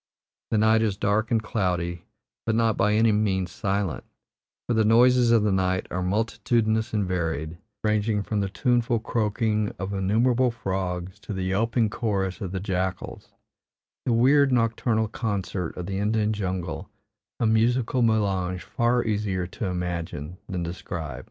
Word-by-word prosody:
The 110 - +1
night 110 +1 +4
is 105 -3 0
dark 105 +2 +1
and 115 -2 +1
cloudy, 90 -5 -2 0.4
but 110 - +2
not 115 -2 +2
by 105 - +2
any 110 +1 +4
means 95 -4 0
silent, 100 -3 -2 0.6
for 120 - +1
the 110 -1 +3
"noises 120 +2 +5
of 115 -2 +4
the 105 - +2
night" 95 -1 +1
are 90 - -2
multitudinous 110 +3 0
and 105 -3 0
varied, 80 -2 -2 0.2
ranging 105 -1 +1
from 105 +1 -2
the 100 -1 -1
tuneful 120 +5 +1
croaking 110 -1 0
of 95 +1 -4
innumerable 115 +6 +2
frogs 95 -5 -3
to 105 - -7
the 95 -1 -3
yelping 110 +4 +1
chorus 100 -5 -2
of 95 -3 -4
the 95 - -2
jackals 95 -1 -4 0.7
the - - +3
weird 135 +4 +4
nocturnal 115 -2 +1
concert 100 -6 -3
of 90 - -4
the 95 +1 -3
Indian 105 +1 +1
jungle, 90 -6 -4 0.5
a 120 - +1
musical 115 +3 +2
melange 95 -5 +1
far 120 +4 +1
easier 100 -4 -1
to 90 +5 -5
imagine 90 -2 -4
than 90 -2 -2
describe. 85 -5 -5
105 Hz, 150 wpm, -25 LUFS, 95-115 Hz, 0.7 s, noises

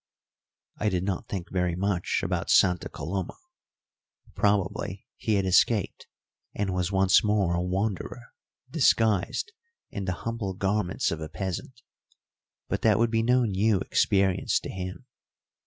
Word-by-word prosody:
I 105 - +1
did 90 -2 -1
not 95 -1 -3
think 95 -3 -5
very 90 -2 0
much 95 -1 0
about - - -2
Santa 90 -2 +4
Coloma. 95 +2 -4 1.0
Probably 100 -2 0
he 110 - 0
had 100 -1 +1
escaped, 95 +2 +2 0.5
and 100 -2 -1
was 90 0 -1
once 95 +3 +4
more 105 -4 +2
a 85 - 0
wanderer 100 +5 -3 0.4
disguised 115 - +2 0.4
in 100 - -4
the 90 - -1
humble 115 -5 -3
garments 95 -1 0
of 80 -1 -4
a 80 - -5
peasant; 95 +8 -5 0.8
but - - -2
that 110 -3 +4
would 115 0 +2
be 115 -1 +2
no 125 +2 +3
new 105 0 +2
experience 95 +1 +1
to - - -6
him. 95 +6 -6
95 Hz, 140 wpm, -27 LUFS, 90-110 Hz, 1.0 s, Santa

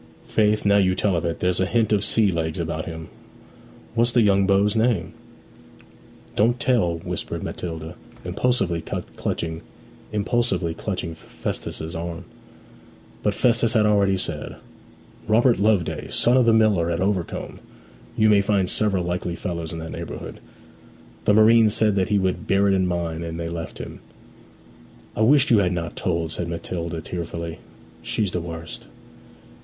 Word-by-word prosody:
'Faith, 105 0 +1
now 100 0 +5
you 95 -2 +3
tell 100 -2 +1
of 85 - -1
it, 85 -1 -3
there's 90 0 +1
a 95 - +2
hint 110 0 +2
of 100 -1 +2
sea 105 -1 +3
legs 80 -1 -2
about 80 -1 -3
him. 80 -1 -7 0.9
What's 120 +1 +2
the 120 - +5
young 100 -2 +3
beau's 100 +2 +3
name?' 110 -6 +1 1.2
'Don't 120 +4 +2
tell!' 110 -10 +2
whispered 80 - -5
Matilda, 80 -2 -5 0.3
impulsively 90 -2 0
clutching 80 0 -4 1.5
Festus's 80 0 -6
arm. 85 +1 -5 1.0
But - - 0
Festus 120 -1 +3
had 110 -3 +4
already 100 -2 +3
said, - - -4 0.7
'Robert 115 +1 +4
Loveday, 100 -4 +1
son 120 - +3
of 125 -2 +4
the - - +7
miller 105 -7 +3
at 85 0 -1
Overcombe. 95 -3 -2 0.6
You 110 - +4
may 105 -2 +5
find 100 -2 +1
several 95 -2 +1
likely 90 0 -2
fellows 85 -2 -4
in 85 - -5
that 80 0 -6
neighbourhood.' 85 0 -7 0.9
The 105 - +4
marine 110 +1 +6
said 105 0 +2
that 95 0 +1
he 105 - +3
would 95 -1 -1
bear 100 +1 +3
it 100 - +3
in 95 -1 +2
mind, 85 -2 -2
and 85 0 -5
they 85 0 -3
left 85 -1 -6
him. - - -8 1.2
'I - - -2
wish 135 +4 +5
you 110 - +6
had 90 -2 +1
not 85 -1 -4
told,' 85 -3 -1
said 85 +1 -3
Matilda 85 0 -4
tearfully. 85 -1 -5 0.4
'She's 105 -4 -1
the 90 - -2
worst!' 80 -1 -7
95 Hz, 150 wpm, -23 LUFS, 85-105 Hz, 1.5 s, the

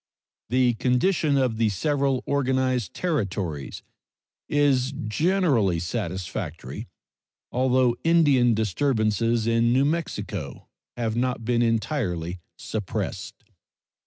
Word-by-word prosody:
The 125 0 +3
condition 140 - +1
of 125 -4 +1
the 115 -1 +2
several 135 - 0
organized 130 -6 0
Territories 100 - -3 0.7
is 140 -3 +2
generally 140 - +2
satisfactory, 90 -1 -4 0.6
although 130 -1 +2
Indian 145 -8 +4
disturbances 110 0 +1
in 115 0 +2
New 130 +3 +3
Mexico 105 - -3 0.3
have 115 -2 -1
not 125 -1 -1
been 120 0 +2
entirely 110 - -1 0.2
suppressed. 105 -4 -5
120 Hz, 90 wpm, -25 LUFS, 105-135 Hz, 0.7 s, Indian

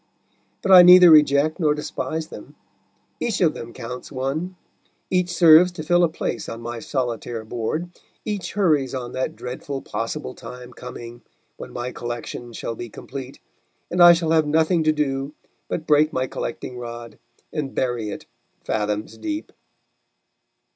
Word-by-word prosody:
But 195 - +1
I 185 -1 +11
neither 180 -1 +9
reject 150 +1 +5
nor 150 -3 +2
despise 155 +1 -4
them; - - -11 0.6
each 230 -4 -1
of 165 -4 +3
them 115 - -8
counts 125 +4 -8
one; 145 +7 -3 0.6
each 180 -1 +1
serves 175 0 +7
to 165 -3 -6
fill 175 +2 +3
a 170 - +3
place 160 - -4
on 115 - -6
my 120 0 -6
solitaire 120 -3 -3
board, 120 +10 -3 0.4
each 205 -3 -4
hurries 150 -10 +1
on 125 -2 -5
that 130 +5 -3
dreadful 135 +2 -6
possible 130 +4 -4
time 125 0 -10
coming 120 -1 -9 0.4
when - - -9
my 120 +1 -4
collection 120 0 -6
shall 115 - -5
be 120 +1 -7
complete, 135 +4 -9 0.5
and 180 - +1
I 175 0 +10
shall 165 -1 -1
have 160 -2 +3
nothing 160 +2 +2
to 155 - +5
do 140 -1 -2 0.3
but 160 - -4
break 150 0 +4
my 130 0 -1
collecting 125 0 -6
rod 120 -1 -8 0.3
and 150 -4 -4
bury 120 -4 -1
it - - -7 0.4
fathoms 105 0 -2
deep. 315 -1 -5
140 Hz, 155 wpm, -22 LUFS, 120-165 Hz, 0.6 s, I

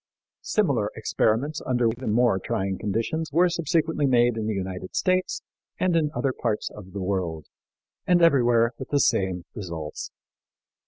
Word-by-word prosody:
Similar 140 - +1
experiments 115 +6 0
under 120 -2 +1
even 115 0 -2
more 115 -3 +3
trying 95 -3 -2
conditions 115 +10 -2
were 175 +5 +4
subsequently 160 -3 0
made 120 -2 +3
in 110 -1 -3
the 110 - -1
United 95 -1 -5
States 185 0 0 0.4
and 185 -2 +2
in 155 -2 +2
other 135 -2 0
parts 110 -4 -2
of 95 -3 -12
the 100 -2 -4
world, 90 -5 -2 0.6
and 180 -1 +5
everywhere 120 -8 +4
with 130 - -7
the 145 - +2
same 95 -8 +1
results. 85 -6 -6
115 Hz, 150 wpm, -25 LUFS, 100-150 Hz, 0.6 s, and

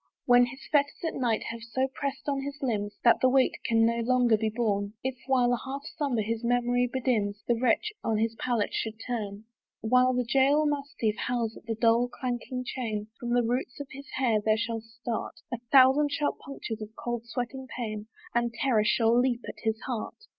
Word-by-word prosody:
When 245 0 +6
his 265 +2 -10
fetters 290 -1 +2
at - - -3
night 235 -4 0
have 230 0 -7
so 245 +3 -1
press'd 280 0 -4
on 280 -1 0
his 280 +1 -5
limbs, 210 -5 -1
That 235 - +5
the 260 - +5
weight 260 0 +3
can 225 -1 +3
no 235 0 +2
longer 245 -1 +3
be 220 0 0
borne, 210 -3 -1
If, 260 0 -1
while 250 -2 +3
a 240 - 0
half 275 +1 -5
slumber 260 -7 0
his 225 +2 -3
memory 245 +1 +2
bedims, 220 -6 0
The 240 - +4
wretch 255 - +2
on 220 - +1
his 225 +1 +1
pallet 235 -4 0
should 220 0 -3
turn, 210 -4 -4 0.4
While 250 +3 +4
the 250 - +1
jail 275 +5 +3
mastiff 280 -7 -1
howls 235 -2 -1
at - - -14
the 225 - -1
dull 230 +2 +3
clanking 250 0 -4
chain, 220 -4 -3
From 240 - -4
the 245 - +3
roots 245 +3 -2
of 285 - -6
his 275 +1 -10
hair 235 -5 +2
there 215 0 +3
shall 225 0 -2
start 230 +1 -5 0.2
A 240 - -2
thousand 275 +2 +6
sharp 290 0 -1
punctures 235 -5 -6
of 215 +1 -8
cold 240 -1 -4
sweating 255 +2 -4
pain, 215 -3 -4 0.3
And 235 0 +1
terror 230 -4 +2
shall 225 +1 +3
leap 245 -1 +2
at - - -8
his 220 -1 0
heart. 240 -4 -4
240 Hz, 200 wpm, -28 LUFS, 225-260 Hz, 0.4 s, When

